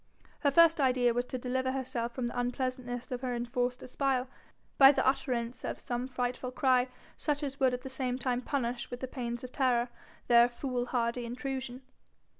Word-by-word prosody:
Her 285 - +3
first 330 +1 +6
idea 250 -2 +3
was 245 +1 0
to 255 - -4
deliver 260 +1 -1
herself 255 -3 -2
from 255 - -2
the 240 - -3
unpleasantness 245 0 -3
of 250 -1 -3
her 250 -2 -2
enforced 245 +1 -2
espial 260 0 0 0.5
by 270 0 +10
the - - 0
utterance 250 -3 0
of - - -3
some 245 +1 -3
frightful 250 0 -2
cry 255 -1 +3 0.3
such 295 -1 -1
as 275 0 -4
would 260 -2 +3
at 250 - -8
the - - -6
same 260 -1 -2
time 250 -1 -1
punish 245 -3 -2
with 245 0 -7
the 260 - -2
pains 240 -2 -4
of 255 - -7
terror 250 -3 +2 0.4
their 235 0 +7
fool 245 0 -3
hardy 240 0 0
intrusion. 255 +1 -5
250 Hz, 185 wpm, -31 LUFS, 245-260 Hz, 0.5 s, by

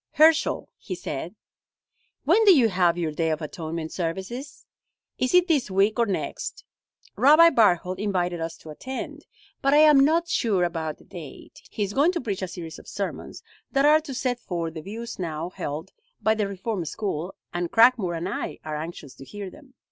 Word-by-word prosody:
"Herschel," 315 +1 +3
he - - -5
said, - - -5 0.9
"when 445 - +4
do 385 -6 +8
you 235 -4 +4
have 180 -3 +2
your 165 -3 -1
Day 160 +2 -1
of 155 -1 -1
Atonement 160 0 -5
services? 190 - -5 0.5
Is 255 +6 +1
it 360 0 +5
this 295 - +1
week 200 +4 +2
or 235 - +3
next? 195 - -4 0.5
Rabbi 310 +5 +7
Barthold 185 - +2
invited 180 -4 -1
us 165 0 -4
to 155 - -11
attend, 260 - -7 0.3
but 275 +1 +3
I - - +6
am 300 -2 +7
not 325 +5 +3
sure 215 - +1
about 160 -3 -2
the - - -19
date. 160 -6 -11
He 210 - -2
is 200 0 -3
going 295 +8 +4
to 345 - -1
preach 205 -7 -3
a 185 - -2
series 170 -2 -8
of - - -16
sermons - - -5 0.3
that 275 +1 +3
are 305 +1 +6
to 280 -4 -7
set 250 -1 -1
forth 170 -7 -4
the 160 - -6
views 225 +6 -7
now 165 0 -4
held 160 -1 -5 0.3
by 220 - +3
the 215 -2 -1
Reform 195 0 -3
school, 180 +1 -4 0.2
and 175 -1 -2
Cragmore 225 -7 +4
and 170 +2 -3
I 200 - -4
are 155 -1 -3
anxious 155 -4 -7
to - - -10
hear 200 +5 -8
them." 275 -4 -17
195 Hz, 190 wpm, -25 LUFS, 170-260 Hz, 0.9 s, do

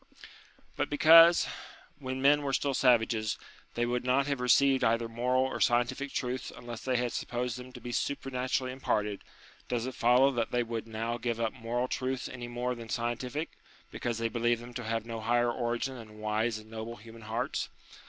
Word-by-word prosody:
But - - 0
because, 165 +3 +7 0.5
when 130 -1 -4
men 145 +1 +5
were 140 -1 -2
still 140 +1 +1
savages, 115 -4 +2 0.4
they 120 - +1
would 120 0 -1
not 130 +2 +2
have 140 -2 -1
received 135 +2 +4
either 115 +1 +2
moral 125 +3 +1
or 130 - -3
scientific 120 +3 +1
truths 125 0 -3
unless 120 -2 -7
they 130 -1 -1
had 120 -1 0
supposed 120 -1 -3
them 125 0 -9
to - - -10
be 120 - -6
super 135 +2 -2
naturally 130 0 -1
imparted, 105 -6 -1 0.5
does 120 -1 -1
it 130 - -4
follow 125 +4 +4
that 120 -3 -1
they 120 0 +1
would 115 -1 -4
now 115 +2 -3
give 120 -1 -2
up 115 -1 0
moral 120 +1 -2
truths 130 0 -2
any 125 -1 -7
more 120 +1 -2
than 115 -1 -8
scien 120 +1 -1
tific, 140 +6 -4 0.4
because 120 -2 -3
they 115 0 0
believed 120 0 0
them 120 0 -10
to 125 - -5
have 115 0 -2
no 115 -1 -5
higher 120 +2 +2
origin 120 +3 -2
than 110 -3 -11
wise 110 +1 0
and 110 0 -13
noble 115 +1 -6
human 115 +1 -13
hearts 115 +3 -2
120 Hz, 190 wpm, -30 LUFS, 115-130 Hz, 0.5 s, because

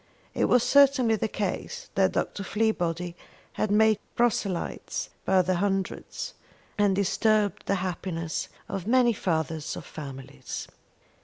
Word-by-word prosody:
It - - +2
was 250 -1 +4
certainly 275 -5 +5
the 220 - -1
case 205 -3 -4
that 190 -1 +3
Dr. - - -1
Fleabody 180 -5 -1 0.4
had 215 - -1
made 215 0 +4 0.2
proselytes 210 -6 -1
by 190 -1 +4
the 180 0 +1
hundred, 195 0 -1 0.7
and 205 -2 +4
disturbed 205 +1 +1
the 200 - +2
happiness 170 -3 -3 0.2
of 195 -1 -4
many 245 0 +4
fathers 160 -5 -2
of - - -8
families. 135 - -7
195 Hz, 125 wpm, -27 LUFS, 175-220 Hz, 0.7 s, certainly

